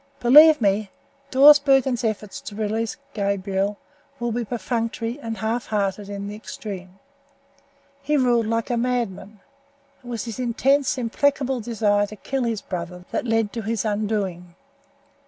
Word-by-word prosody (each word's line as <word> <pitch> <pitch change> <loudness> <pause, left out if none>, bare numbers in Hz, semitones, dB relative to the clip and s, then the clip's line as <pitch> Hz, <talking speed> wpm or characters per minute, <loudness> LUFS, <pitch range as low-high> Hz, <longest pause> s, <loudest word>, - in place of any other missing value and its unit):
Believe 300 +6 +8
me, 205 -1 +1 0.4
Dawsbergen's 270 -3 +5
efforts 215 -2 -3
to 205 - -9
release 220 +1 -2 0.2
Gabriel 200 0 -1 0.4
will 240 -1 -2
be 240 +1 -1
perfunctory 230 +1 -3
and 225 -4 -5
halfhearted 210 -3 -2
in 200 0 -5
the 205 - -6
extreme. 195 -3 -8 1.0
He 295 +1 +1
ruled 240 -4 +2
like 230 +1 -1
a 240 - +1
madman. 225 -5 -2 0.6
It - - -14
was 235 -1 -4
his 230 0 -6
intense, 265 +3 +1
implacable 265 +2 0
desire 210 -3 +1
to 215 - -10
kill 265 +4 -3
his 225 -3 -2
brother 180 -1 -6
that - - -2
led 225 -2 +1
to 230 - -3
his 220 0 -2
undoing. 205 -5 -2
225 Hz, 135 wpm, -23 LUFS, 205-245 Hz, 1.0 s, Believe